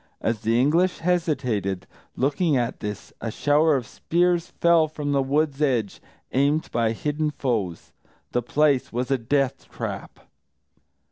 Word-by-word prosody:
As 115 -1 -1
the 115 +2 +1
English 170 +8 +3
hesitated, 130 - -1 0.3
looking 145 +3 +1
at 120 -1 -1
this, 105 -1 -6
a 115 - -2
shower 145 +6 +3
of 130 -3 -1
spears 175 +6 +1
fell 170 -2 +5
from 150 -2 -4
the 140 -1 +2
wood's 145 +1 0
edge, 120 -9 0 0.3
aimed 145 +4 +1
by 115 -2 +1
hidden 150 +5 -1
foes. 110 - -3 0.4
The 120 - +1
place 140 +2 +2
was 125 +3 -2
a 135 - +2
death 135 +3 -1
trap. - - -6
140 Hz, 140 wpm, -24 LUFS, 120-155 Hz, 0.4 s, fell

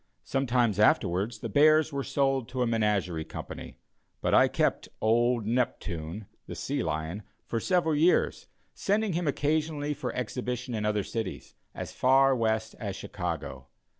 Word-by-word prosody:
Some 135 0 -1
time 120 -2 +3
afterwards 100 +1 +2
the 115 - -3
bears 155 +6 +4
were 140 0 -1
sold 135 -4 0
to 125 0 -1
a - - +1
menagerie 105 -8 0
company, 80 - -8 0.4
but - - 0
I - - +7
kept - - 0
"old 120 +1 +2
Neptune," 105 -6 -2 0.2
the - - -6
sea - - -2
lion, 80 +5 -3 0.2
for 115 - -2
several 175 +1 +1
years, 160 +4 +2 0.3
sending 205 0 0
him 170 0 -1
occasionally 150 +1 0
for 145 - -4
exhibition 125 +1 -3
in 105 -2 -2
other 105 -1 +1
cities, 110 -1 -5 0.2
as - - -5
far 135 +1 +4
west 110 -2 0
as 100 -4 -4
Chicago. - - -5
120 Hz, 150 wpm, -28 LUFS, 105-145 Hz, 0.4 s, I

